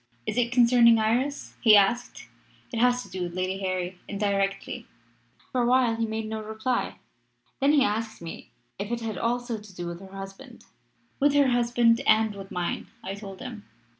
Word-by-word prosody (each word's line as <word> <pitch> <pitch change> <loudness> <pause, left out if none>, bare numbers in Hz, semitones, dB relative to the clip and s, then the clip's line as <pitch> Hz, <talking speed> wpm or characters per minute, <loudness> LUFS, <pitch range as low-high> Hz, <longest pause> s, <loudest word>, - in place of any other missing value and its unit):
"'Is - - -2
it 240 -1 +1
concerning 235 -1 +6
Iris?' 245 +6 0
he 215 -3 +8
asked. 220 +5 +1 0.5
"'It 230 - -1
has 245 +1 +3
to - - -14
do 185 - -5
with 175 0 -4
Lady 185 +1 -2
Harry 185 -1 -3
indirectly.' 195 -1 -2 0.6
"For 255 - +1
a - - +2
while 250 -2 +3
he 225 0 -1
made 220 0 -3
no 220 0 -4
reply. 220 +3 -2 0.6
Then 280 +2 +4
he 285 -3 +5
asked 220 +1 -2
me 165 -1 -9 0.3
if 200 +1 -4
it 240 -1 -2
had 220 -4 -4
also 240 -1 -1
to 205 -3 -15
do 175 - -5
with 170 0 -5
her 190 0 -12
husband. 195 0 -10 0.5
"'With 290 0 +3
her 285 -2 +5
husband 240 0 +3
and 220 0 +4
with 195 -1 -9
mine,' 175 -1 -3 0.2
I 190 - -4
told 195 0 -9
him. 240 -5 -8
220 Hz, 185 wpm, -26 LUFS, 195-245 Hz, 0.6 s, he